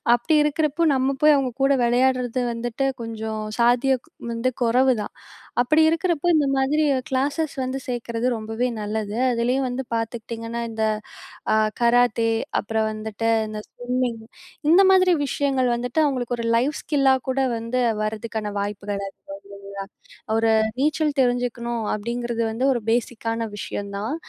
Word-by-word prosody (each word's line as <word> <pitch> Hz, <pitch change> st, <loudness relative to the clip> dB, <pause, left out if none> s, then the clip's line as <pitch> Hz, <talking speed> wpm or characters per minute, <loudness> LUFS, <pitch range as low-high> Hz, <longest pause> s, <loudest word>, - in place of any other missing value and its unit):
அப்டி 305 Hz, +6 st, +1 dB
இருக்கிறப்போ, 305 Hz, +2 st, +1 dB
நம்ம 265 Hz, +1 st, +1 dB
போய் 305 Hz, -1 st, +7 dB
அவங்க 260 Hz, -3 st, 0 dB
கூட 275 Hz, -, +4 dB
வெளயாடுறது 250 Hz, 0 st, +1 dB
வந்துட்டு 240 Hz, +3 st, -2 dB, 0.2 s
கொஞ்சம் 220 Hz, -1 st, -4 dB, 0.2 s
சாத்தியக் 250 Hz, +4 st, +2 dB, 0.2 s
வந்து 230 Hz, +2 st, 0 dB
கொறவுதான். 240 Hz, -2 st, +2 dB, 0.5 s
அப்படி 305 Hz, +6 st, +3 dB
இருக்கறப்போ 330 Hz, 0 st, +1 dB
இந்த 300 Hz, -, +3 dB
மாதிரி 275 Hz, +3 st, +2 dB, 0.2 s
கிளாஸஸ் 285 Hz, +3 st, -1 dB
வந்து 260 Hz, +1 st, -3 dB
சேர்க்கிறது 240 Hz, -1 st, -2 dB
ரொம்பவே 225 Hz, +3 st, -2 dB
நல்லது. 210 Hz, 0 st, -3 dB
அதிலேயும் 245 Hz, +3 st, +1 dB
வந்து 250 Hz, +2 st, -3 dB
பார்த்துக்கிட்டிங்கன்னா 230 Hz, 0 st, -4 dB
இந்த, 220 Hz, -1 st, -3 dB, 0.7 s
அ -, -, +4 dB, 0.3 s
கராத்தே 235 Hz, -1 st, +3 dB, 0.3 s
அப்புறம் 220 Hz, 0 st, -1 dB
வந்துட்டு 215 Hz, +1 st, -3 dB, 0.2 s
இந்த 215 Hz, 0 st, -6 dB
ஸ்விம்மிங், 245 Hz, -1 st, -2 dB, 0.5 s
இந்த 360 Hz, +4 st, +7 dB
மாதிரி 370 Hz, -1 st, +5 dB
விஷயங்கள் 270 Hz, -2 st, 0 dB
வந்துட்டு 245 Hz, +5 st, -1 dB
அவங்களுக்கு 250 Hz, -4 st, -1 dB
ஒரு 230 Hz, -, -3 dB
லைஃப் 265 Hz, +6 st, +1 dB
ஸ்கில்லா 275 Hz, -3 st, +3 dB
கூட 260 Hz, +1 st, 0 dB, 0.2 s
வந்து, 230 Hz, +2 st, -2 dB, 0.2 s
வரதுக்கான 215 Hz, 0 st, -3 dB
வாய்ப்புகள் 200 Hz, 0 st, -3 dB
அதிகம் 195 Hz, -, -8 dB, 0.6 s
இல்லைங்களா. 200 Hz, 0 st, -6 dB, 0.5 s
ஒரு 225 Hz, 0 st, +2 dB, 0.3 s
நீச்சல் 300 Hz, +1 st, +1 dB
தெரிஞ்சுக்கணும், 245 Hz, -2 st, 0 dB
அப்படிங்கிறது 235 Hz, +2 st, -3 dB
வந்து 235 Hz, +4 st, -1 dB
ஒரு 240 Hz, -3 st, 0 dB
பேஸிக்கான 230 Hz, -1 st, -1 dB
விஷயந்தான். 205 Hz, +5 st, -4 dB
240 Hz, 130 wpm, -23 LUFS, 225-270 Hz, 0.7 s, போய்